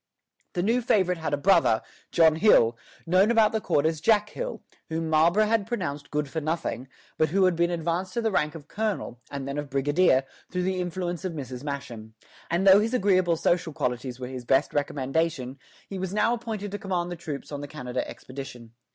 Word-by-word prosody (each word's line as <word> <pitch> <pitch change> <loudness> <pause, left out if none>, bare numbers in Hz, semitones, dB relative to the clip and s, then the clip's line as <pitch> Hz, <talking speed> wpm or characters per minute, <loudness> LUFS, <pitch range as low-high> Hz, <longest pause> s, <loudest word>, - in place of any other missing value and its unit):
The 175 - -1
new 235 +5 +2
favorite 190 -8 +2
had 160 - -3
a 145 - +1
brother, 145 - +3 0.3
John 160 -2 +5
Hill, 120 - +5 0.3
known 185 +5 +4
about 225 -2 +4
the 220 - -1
court 155 -6 +1
as 160 -1 0
Jack 210 +1 +3
Hill, - - -5 0.3
whom 160 0 -2
Marlborough 170 +7 +4
had 215 -2 +1
pronounced 150 -11 -4
good 150 0 -1
for 160 +3 -4
nothing, 145 -5 -3 0.3
but 155 - +3
who 190 +4 +3
had 185 -2 +3
been 170 +1 +2
advanced 175 +2 -2
to 235 - +1
the 220 - +1
rank 150 -5 0
of 155 -2 -10
colonel, 205 - -3
and 140 -1 -5
then 140 +1 -3
of 145 -1 -6
brigadier, 140 0 +3 0.3
through 180 0 -1
the 185 0 -1
influence 175 0 -3
of 185 -3 -3
Mrs. 130 -4 -6
Masham; 120 -7 -6 0.3
and 175 +3 +1
though 195 +1 +8
his 225 +4 0
agreeable 185 -6 +3
social 165 0 0
qualities 125 -1 -3
were 125 - -4
his 130 -1 -7
best 135 +2 +2
recommendation, 145 -1 -1 0.3
he 195 - -6
was 190 +1 -3
now 225 +2 +3
appointed 220 -4 -4
to 205 - -4
command 180 -3 -2
the - - -3
troops 155 -5 -7
on 145 -1 -4
the 145 - -6
Canada 125 -4 -4
expedition. 130 -3 -9
165 Hz, 205 wpm, -26 LUFS, 140-190 Hz, 0.3 s, though